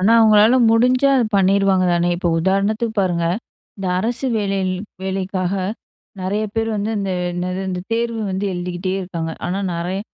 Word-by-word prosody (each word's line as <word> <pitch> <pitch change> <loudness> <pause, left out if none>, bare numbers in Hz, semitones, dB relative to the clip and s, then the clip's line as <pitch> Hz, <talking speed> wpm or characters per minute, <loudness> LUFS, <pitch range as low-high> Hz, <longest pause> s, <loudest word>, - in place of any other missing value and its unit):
ஆனா, 205 +5 +4
அவங்களால 215 +2 +6
முடிஞ்சா, 250 +4 +4
அத 245 - +3
பண்ணிடுவாங்க 195 -1 +3
தானே. 175 0 +1
இப்ப 175 -1 -1
உதாரணத்துக்கு 205 +5 0
பாருங்க, 175 -3 0 0.5
இந்த 195 -2 -5
அரசு 240 +6 -1
வேலை 195 -2 0 0.4
வேலைக்காக 190 -1 -2 0.7
நெறய 200 +4 -1
பேர் 225 0 0
வந்து, 210 +2 -2
இந்த 195 -1 -2 0.2
என்னது, 180 +1 -3
இந்த 180 -1 -3
தேர்வு 230 -1 -1
வந்து, 190 +2 -2
எழுதிக்கிட்டே 180 +1 -3
இருக்காங்க. 165 -3 -4
ஆனா 190 +3 -2
நெறய 180 +3 -3
195 Hz, 150 wpm, -20 LUFS, 185-220 Hz, 0.7 s, அவங்களால